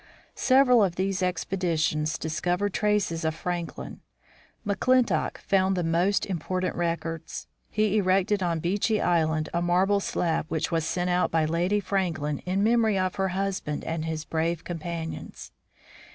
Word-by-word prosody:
Several 255 -3 +5
of 180 -3 0
these 190 +1 -1
expeditions 165 -4 0
discovered 175 +5 -1
traces 210 -6 0
of 160 -1 0
Frank 175 0 -4
lin. - - -8 0.6
McClintock 250 +5 +2
found 190 -1 +1
the 175 - 0
most 175 +4 +2
important 185 0 -2
records. 165 -1 -3 0.2
He 215 -1 +1
erected 195 +1 +2
on 170 -3 0
Beechey 205 +5 +1
island 160 -3 +1
a 170 - +1
marble 185 +4 +3
slab 165 -5 -1
which 160 +2 -2
was 165 -2 0
sent 180 0 -1
out 180 0 +2
by 160 -1 +2
Lady 175 +6 +1
Franklin 170 -7 -1
in 190 +2 +1
memory 225 -2 +3
of 185 -1 -1
her 195 0 +1
husband 185 -5 -2
and 165 -1 -3
his 160 -1 -3
brave 165 +1 -1
companions. 165 -1 -6
180 Hz, 145 wpm, -26 LUFS, 165-195 Hz, 0.6 s, Several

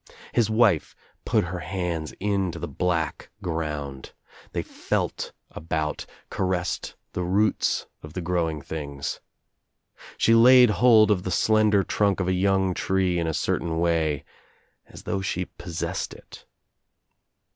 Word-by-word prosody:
His 115 -3 +2
wife 110 -7 +3 0.3
put - - +2
her 90 +1 -4
hands 85 -3 -3
into 95 -3 -1
the - - -4
black 85 -5 -2
ground. 75 -6 -4 0.4
They - - -2
felt - - -3 0.2
aboutf 80 -1 -3 0.2
caressed 90 -1 -2 0.2
the - - -2
roots 100 +5 +1 0.2
of 75 0 -11
the 90 - -4
growing 85 -4 -1
things. 70 -3 -5 1.0
She 115 - +4
laid 125 0 +8
\ - - -3
hold 110 -4 +7
of 95 -3 +2
the 95 - -4
slender 105 +1 +3
trunk 100 +1 +1
of 95 - -1
a 95 - +2
young' 95 0 +2
tree 95 -1 0
in 85 - -1
a 80 - -1
certain 80 -1 -1
way 80 -4 +1 0.3
— - - -40
as - - -11
though 95 - -2
she 90 -1 -2
possessed 85 -1 -5
it. - - -15
90 Hz, 140 wpm, -25 LUFS, 80-100 Hz, 1.0 s, laid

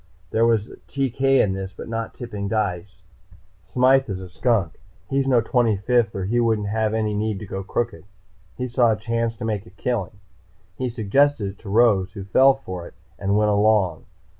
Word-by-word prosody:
"There 115 +1 +3
was 110 -2 +1 0.2
TK 135 -2 -3
in 135 -7 +4
this, 95 0 -5
but - - -7
not 115 0 -4
tipping 105 -5 -5
dice. 90 -4 -3 0.6
Smythe 130 +6 +3
is 95 -1 -3
a 95 -1 -9
skunk. 95 0 0 0.3
He's 135 0 +1
no 125 -3 +4
Twenty 115 -2 +1
fifth, 115 +1 +1
or 95 -1 -2
he 120 +5 +1
wouldn't 110 -3 +1
have 110 0 0
any 110 -1 0
need 105 0 -1
to 105 - -7
go 95 0 -5
crooked. 115 +2 -3 0.5
He 125 - -2
saw 120 -2 +3
a - - -1
chance 115 +1 -2
to 110 - -5
make 105 -2 -3
a - - -12
killing. 100 -1 -3 0.6
He 130 +3 -2
suggested 115 0 +1
it 100 - -20
to 105 - -10
Rose, 105 -4 +3
who 100 -3 -7
fell 130 +7 +5
for 90 -10 -7
it - - -16 0.2
and 100 +1 +1
went 105 0 +3
along. 100 -5 +2
110 Hz, 190 wpm, -23 LUFS, 100-120 Hz, 0.6 s, fell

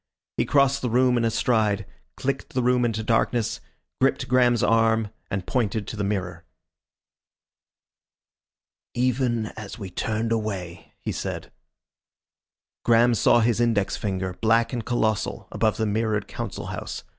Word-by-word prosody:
He - - +2
crossed 140 -1 +3
the 125 - -1
room 125 +1 +3
in 120 - +1
a 115 - +3
stride, 110 -3 +1 0.3
clicked 135 -1 -3
the 130 - +1
room 125 0 +3
into 110 -1 -1
darkness, 115 +1 0 0.4
gripped - - +1
Graham's 125 -2 +3
arm 115 -1 +3 0.2
and 95 -1 -3
pointed 110 -4 -1
to - - -6
the 105 - -2
mirror. 90 -4 -3 2.5
"Even 120 -2 0
as 105 -3 -8
we 95 -4 -7
turned 110 +4 -2
away," 100 -6 -4
he - - -4
said. - - -5 1.3
Graham 120 +1 +5
saw 115 +1 +4
his 115 0 +2
index 105 -5 +1
finger, 95 -2 -3
black 115 +2 +3
and 120 -2 -2
colossal, 110 -4 -1
above 110 -2 +1
the 110 - 0
mirrored 105 -1 0
Council - - -5
House. - - -6
115 Hz, 140 wpm, -25 LUFS, 105-120 Hz, 2.5 s, Graham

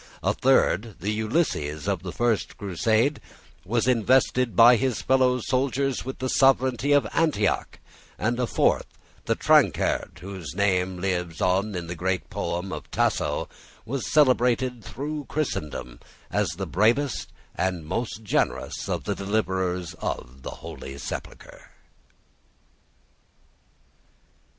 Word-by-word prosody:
A - - +2
third, 105 +3 +2
the 100 +4 -1
Ulysses 105 - -1
of - - 0
the - - -5
first 120 -3 0
crusade, 110 - +1 0.4
was 115 +4 0
invested 125 -1 +3
by 120 +4 +8
his 130 0 -1
fellow 130 -1 +3
soldiers 135 +2 0
with 130 +1 -6
the 130 - -2
sovereignty 130 0 +3
of 145 -4 +5
Antioch; 145 -11 +1 0.4
and 120 +4 -1
a 125 - +1
fourth, - - +2 0.4
the - - +1
Tancred - - +2
whose 95 -6 -7
name 95 -2 +1
lives 90 -3 -2
in 95 -1 0
the 85 - -5
great 90 +2 -2
poem 85 +3 -3
of - - -7
Tasso, - - 0 0.4
was 135 +2 -3
celebrated 125 -4 +3
through 145 +3 -5
Christendom 75 - -4 0.3
as 105 -2 +1
the 95 +3 -4
bravest 115 - +1 0.2
and 90 -4 -2
most 110 +6 -3
generous 105 - -1
of - - -2
the - - -1
deliverers 95 -4 -1
of 65 +2 -5
the - - -6 0.2
Holy 70 +1 -8
Sepulchre. - - -8
110 Hz, 120 wpm, -25 LUFS, 90-130 Hz, 0.4 s, by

